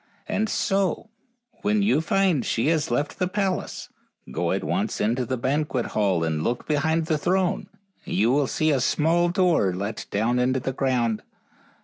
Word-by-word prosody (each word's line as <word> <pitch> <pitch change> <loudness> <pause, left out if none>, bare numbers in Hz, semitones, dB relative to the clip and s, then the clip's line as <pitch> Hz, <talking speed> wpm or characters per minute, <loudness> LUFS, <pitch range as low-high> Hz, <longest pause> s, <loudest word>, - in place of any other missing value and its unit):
And 220 +1 0
so, 195 +2 0 0.5
when 205 0 +2
you 200 -6 +3
find 175 -4 +2
she 115 +6 0
has 160 -3 +1
left 145 +5 -1
the 180 - +1
palace, 195 -1 -2 0.4
go - - -1
at - - -1
once - - -1
into 120 +3 0
the 130 - -1
banquet 130 0 -1
hall 95 -6 +1
and 80 -1 -1
look 120 +1 -2
behind 160 +2 +1
the 155 -2 0
throne, 185 +3 0 0.4
and - - -3
you 110 +6 +3
will 140 0 +2
see 155 +6 +1
a 140 - +2
small 165 +6 +2
door 170 - +2
let 105 +3 -4
down 115 +5 +1
into 130 +1 +2
the 130 +1 -3
ground. 125 -5 0
145 Hz, 170 wpm, -24 LUFS, 120-175 Hz, 0.5 s, you